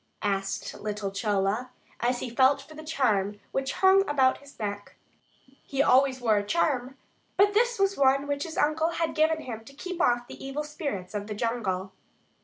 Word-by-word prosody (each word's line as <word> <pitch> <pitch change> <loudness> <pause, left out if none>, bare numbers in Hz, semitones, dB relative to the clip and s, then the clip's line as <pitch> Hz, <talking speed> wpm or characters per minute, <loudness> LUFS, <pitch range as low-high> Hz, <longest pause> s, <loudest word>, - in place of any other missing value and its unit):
asked 195 -1 -2
little 210 -2 -3
Chola, 205 +3 0 0.3
as 245 +1 0
he - - -3
felt 265 +3 +4
for 280 +3 -13
the 310 0 -9
charm 210 -10 0
which 270 -1 -1
hung 380 +1 +7
about 265 -3 +3
his 280 0 -16
neck. 205 -1 -5 0.7
He 275 0 0
always 260 0 +4
wore 225 -4 +3
a - - -3
charm, 265 0 0 0.4
but 405 +1 +5
this 475 +3 +2
was 390 0 +2
one 275 0 +4
which 285 0 -2
his 320 0 -5
uncle 310 +2 +2
had 330 -1 -1
given 315 0 +2
him 225 -5 -7
to 275 +4 -15
keep 365 +3 -5
off 240 0 +2
the - - -10
evil 270 +2 -3
spirits 280 - -5
of 205 0 -4
the 210 - -4
jungle. 205 -5 -2
260 Hz, 185 wpm, -27 LUFS, 210-300 Hz, 0.7 s, hung